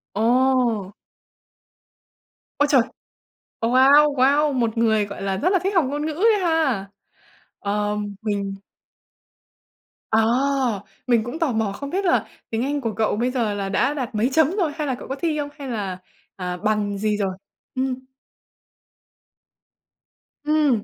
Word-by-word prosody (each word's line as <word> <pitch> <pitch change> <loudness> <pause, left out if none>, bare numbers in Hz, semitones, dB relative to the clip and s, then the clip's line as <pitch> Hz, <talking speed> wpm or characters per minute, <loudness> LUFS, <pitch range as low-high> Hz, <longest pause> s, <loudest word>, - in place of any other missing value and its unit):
Ồ! 235 -3 +2 1.7
Ôi 290 - +4
trời! 270 -4 +6 0.8
Ờ, 230 - 0
wow, 280 +4 +6
wow! 285 +3 +3
Một 235 -3 0
người, 220 -2 +3
gọi 200 -1 -8
là, 195 -1 -1
rất 340 - +1
là 380 -1 +3
thích 390 +2 0
học 345 -5 +4
ngôn 290 +2 -2
ngữ 315 - -2
ấy 425 +7 +3
ha! 310 - +1 0.7
Ờm, 205 0 -2
mình 200 -2 -2 1.6
À. 220 - +3 0.9
Mình 235 -3 +3
cũng 245 +7 -6
tò 325 -6 +1
mò 220 -3 0
không 280 +8 -6
biết 385 +5 -1
là 355 - +2 0.2
tiếng 225 +1 -1
Anh 285 +1 -1
của 225 -3 -2
cậu 215 +1 0
bây 245 +4 0
giờ 230 -5 0
là 200 -1 -3
đã 235 +8 +1
đạt 255 -6 -4
mấy 220 +4 +2
chấm 320 0 +4
rồi, 365 -6 0
hay 305 -2 -3
là 260 - 0
cậu - - -10
có 270 - -3
thi 320 -1 0
không, 290 0 -3
hay 275 - -6
là, 200 -6 -3 0.4
à, 180 -1 -4
bằng 210 0 0
gì 210 +1 0
rồi? 195 -2 -1 0.4
Ừm. 260 0 -2 2.4
Ừm. 295 -7 +2
245 Hz, 155 wpm, -22 LUFS, 210-290 Hz, 2.4 s, trời